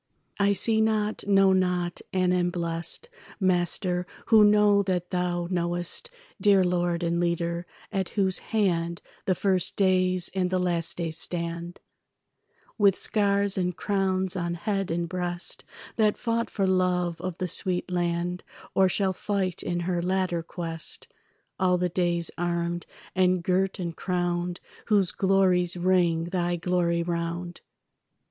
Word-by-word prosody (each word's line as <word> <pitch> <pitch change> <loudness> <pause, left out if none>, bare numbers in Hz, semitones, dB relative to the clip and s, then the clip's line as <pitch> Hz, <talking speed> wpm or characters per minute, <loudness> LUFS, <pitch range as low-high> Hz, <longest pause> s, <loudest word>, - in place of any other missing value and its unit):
I 200 0 +4
see 220 +2 +2
not, 215 -1 0
know 195 -1 +5
not, 180 -2 0
and 185 -1 +2
am 175 -1 +2
blest, 170 - -1 0.3
Master, 180 -1 +1 0.2
who 220 -2 +6
know 205 -1 +5
that 180 -2 -2
thou 175 -1 -1
knowest, 175 - -2 0.3
Dear 200 -3 +5
lord 175 -1 0
and 170 0 0
leader, 170 0 -1 0.2
at 195 -3 -1
whose 190 -2 +1
hand 170 -6 -1 0.2
The 185 - +2
first 185 -1 +1
days 185 -2 +3
and 185 -1 0
the 185 - +1
last 175 -2 -1
days 165 -2 -2
stand, 170 +1 -3 1.0
With 200 -2 +5
scars 200 -2 +1
and 180 -1 -1
crowns 190 -2 0
on 170 -1 -2
head 195 +1 -2
and 170 +1 -1
breast, 175 0 -4 0.3
That 215 -2 +3
fought 230 0 -1
for 195 - -1
love 180 -2 +1
of 185 -2 -4
the 185 - -2
sweet 180 +1 0
land 175 0 -1 0.3
Or 190 -1 +4
shall 190 0 0
fight 190 -2 -2
in 175 0 -2
her 175 0 -1
latter 185 -1 0
quest; 165 -1 -5 0.5
All 180 -1 +3
the 180 0 0
days 170 -1 0
armed 175 0 -2 0.3
and 185 -1 +2
girt 190 +2 +1
and 170 -3 -4
crowned 175 0 -2 0.3
Whose 200 -4 +3
glories 185 -2 +2
ring 175 -2 +2
thy 175 0 -1
glory 170 -1 0
round. 170 +1 -4
180 Hz, 140 wpm, -26 LUFS, 175-190 Hz, 1.0 s, who